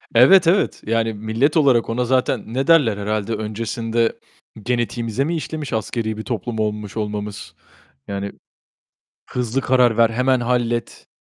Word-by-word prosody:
Evet, 165 +9 +7
evet. 185 +4 +2
Yani, 115 0 +1
millet 110 +8 0
olarak 130 -7 +3
ona 125 +2 0
zaten 130 -2 +1
ne 135 +4 -1
derler 145 -11 +4
herhâlde? 105 +1 -2
Öncesinde 115 +1 -2 0.5
genetiğimize 120 +1 -1
mi 170 +4 -1
işlemiş 155 -3 -5
askeri 110 0 -2
bir 110 - -5
toplum 115 -1 -4
olmuş 105 -1 -3
olmamız? 105 -1 -5 0.5
Yani 100 0 -4 1.0
hızlı 125 +1 -1
karar 125 -3 +3
ver, 115 0 +4
hemen 125 +2 +1
hallet. 120 -1 -2
115 Hz, 135 wpm, -20 LUFS, 110-130 Hz, 1.0 s, Evet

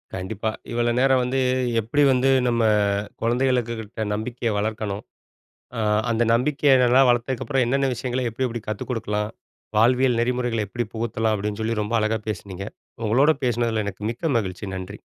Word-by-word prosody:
கண்டிப்பா. 100 +4 -3 0.2
இவ்வளோ 120 0 +1
நேரம் 130 -1 +4
வந்து, 130 +2 -1 0.4
"எப்பிடி 120 +7 +1
வந்து 130 +1 +3 0.2
நம்ம, 120 -1 +1 0.6
குழந்தைகளுக்கு 120 0 +1
கிட்ட 110 0 -5
நம்பிக்கைய 115 +2 -2
வளர்க்கணும். 105 -1 -3 0.7
அ, - - -2 0.3
அந்த 115 +1 +2
நம்பிக்கைய 140 +3 +3
நல்லா 125 +2 +5
வளர்த்ததுக்கப்புறம், 125 +2 +1
என்னென்ன 135 +2 +1
விஷயங்கள, 125 +2 -2
எப்படி 130 +3 -1
எப்படி 120 -1 -5
கத்துக் 110 - -4
குடுக்கலாம்? 105 -3 -2 0.5
வாழ்வியல் 125 +2 +4
நெறிமுறைகள 120 -3 0
எப்படி 120 +4 -3
புகுத்தலாம்?" 110 -1 0
அப்படின்னு 105 +1 -3
சொல்லி, 115 +1 -1
ரொம்ப 110 +3 -1
அழகா 110 0 0
பேசினீங்க. 100 -2 -5 0.4
உங்களோட 135 +8 +4
பேசினதுல 115 -2 0
எனக்கு 100 +1 -6
மிக்க 160 +8 -3
மகிழ்ச்சி. 95 -1 -5
நன்றி. 95 +3 -7
115 Hz, 145 wpm, -23 LUFS, 110-125 Hz, 0.7 s, நல்லா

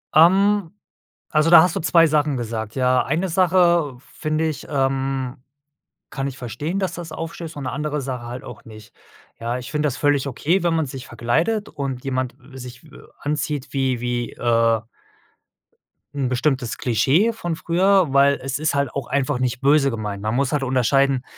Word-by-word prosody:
Ähm, 190 +3 +4 0.6
also, 155 +1 +2
da 170 -1 +9
hast 180 0 +1
du - - -1
2 165 0 +5
Sachen 150 -3 +1
gesagt, 110 -2 -4
ja? 125 -1 +2
Eine 170 +6 -1
Sache 175 -5 +3
finde 155 +3 -2
ich 155 -2 -5
ähm, 135 -2 -1 0.7
kann 135 -1 -3
ich 135 0 -8
verstehen, 140 - -4
dass 190 -3 -2
das 170 -2 -7
aufstößt 165 -1 -7
und 145 - -5
'ne - - -3
andere 150 +2 -2
Sache 125 -3 -5
halt 125 +1 -7
auch 120 - -10
nicht. 110 -1 -14 0.5
Ja, 120 +2 -2
ich 125 - -8
finde 150 0 0
das 140 -3 -2
völlig 145 -1 +1
okay, 165 +8 0
wenn 170 -1 +1
man 160 -2 0
sich 130 -1 -8
verkleidet 160 - -1
und 135 -4 -5
jemand, 130 -2 -2 0.2
äh, - - -9
sich, 125 0 -10
äh, - - -17 0.3
anzieht, 150 -1 -2
wie 130 -3 0
wie, 120 -1 -2
äh 115 -1 +2 1.3
'n 135 -3 -1
bestimmtes 130 -1 -1
Klischee 140 - +2
von 175 -6 -4
früher, 180 -1 +2
weil 140 0 +4
es 135 +1 -3
ist 155 -1 0
halt 140 -1 0
auch 135 -3 -4
einfach 140 -1 0
nicht 125 -1 -1
böse 140 0 +4
gemeint. 105 -3 -4
Man 110 +2 -1
muss 135 0 +1
halt 145 -2 0
unterscheiden: 135 +1 +2
140 Hz, 180 wpm, -22 LUFS, 125-160 Hz, 1.3 s, da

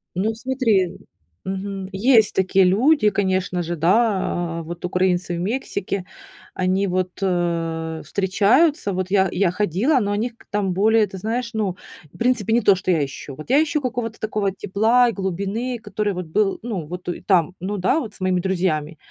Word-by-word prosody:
Ну 210 +5 0
смотри, 225 -7 0 0.5
мгм, 195 0 -4
есть 220 +2 +4
такие 190 0 +3
люди, 215 +6 +4
конечно 185 -2 0
же, 170 +1 -3
да, 175 -2 +1
э, - - -8
вот 170 +1 -8
украинцы 180 -1 0
в - - -4
Мексике, 195 -2 -3 0.5
они 185 +2 0
вот, 185 0 -1
э, 165 -3 -1
встречаются, 205 - +2
вот 185 -1 -2
я 190 -2 +3
я 185 -2 +1
ходила, 210 - +1
но 205 -3 -1
они 220 +4 -1
к 230 - -23
там 200 -3 0
более, 215 +3 +3
ты 190 - -9
знаешь, 230 +5 -3
ну, 205 -5 -2 0.4
в - - -15
принципе, 235 -3 +1
не 240 - +4
то, 200 -2 +5
что 185 0 -1
я 160 -4 +2
ищу. 135 0 -9
Вот 155 - -11
я 285 +4 +5
ищу 300 -1 -1
какого-то 240 -3 -3
такого 210 -2 -1
тепла 220 +6 +2
и - - -3
глубины, 200 +6 -3
который 210 -3 -2
вот 180 -1 -5
был, 195 +5 0
ну 205 -9 -4
вот 180 +4 -8
и 175 - -4
там, 180 -2 +2
ну 200 +3 -3
да, 190 - +2
вот 225 -8 -6
с - - -15
моими 185 -1 +1
друзьями. 175 -4 -1
195 Hz, 180 wpm, -22 LUFS, 180-220 Hz, 0.5 s, то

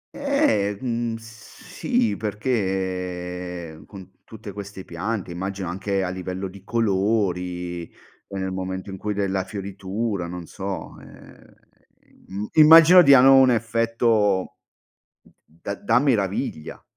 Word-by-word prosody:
Eh, 280 - +1
mhmm, 120 -2 -2
sì, 180 - -3
perché, 90 -5 -3
ehm, 80 -1 -14
con 95 -2 -12
tutte 110 -2 -10
queste 100 -1 -9
piante 95 +2 -4
immagino 95 +1 -4
anche 95 +2 -2
a 90 - -2
livello 95 +1 -5
di 95 0 -14
colori 95 -5 -1
e 100 - -13
nel 95 0 -3
momento 95 +1 -5
in 95 - -7
cui 105 +1 -3
della 95 -2 -1
fioritura, 100 0 -4
non 90 -1 -7
so, 95 +2 -6
ehm, - - -17 0.7
im 100 +3 -5
immagino 165 +3 +9
diano 135 -3 +7
un 130 -1 +6
effetto 115 -4 +1 0.6
d - - -25 0.3
da- 100 - -4
da 115 +2 +3
meraviglia. 100 - -1
100 Hz, 120 wpm, -23 LUFS, 95-115 Hz, 0.7 s, immagino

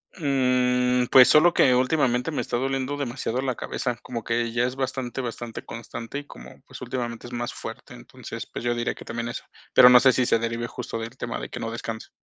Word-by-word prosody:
Mm, 125 -4 +2
pues, 130 -1 +9
solo 170 +3 +6
que 130 -2 +5
últimamente 125 +1 +1
me 150 - -1
está 120 - -2
doliendo 135 +2 -2
demasiado 130 -2 -2
la 130 -2 -1
cabeza, 125 0 -3
como 120 -3 -6
que 115 +1 -1
ya 120 +1 +1
es 125 +1 -3
bastante, 130 -1 -3
bastante 120 -1 -6
constante, 115 +3 -7
y 145 - -11
como, 65 - -13
pues, - - -12
últimamente 120 -2 -4
es 120 - -11
más 120 0 -3
fuerte. - - -9
Entonces, - - -9
pues, - - -6
yo 120 0 +1
diría 120 0 -2
que - - -12
también 115 0 -4
eso, 120 - -6 0.3
pero, 125 - +9
no 125 0 +9
sé, 130 0 +5
si 125 - +2
se 115 - +2
derive 115 +1 -2
justo 120 -1 -6
del 115 +3 -7
tema 120 - -4
de - - -7
que - - -7
no 115 - -4
descanse. 115 -1 -6
125 Hz, 220 wpm, -25 LUFS, 115-130 Hz, 0.3 s, pues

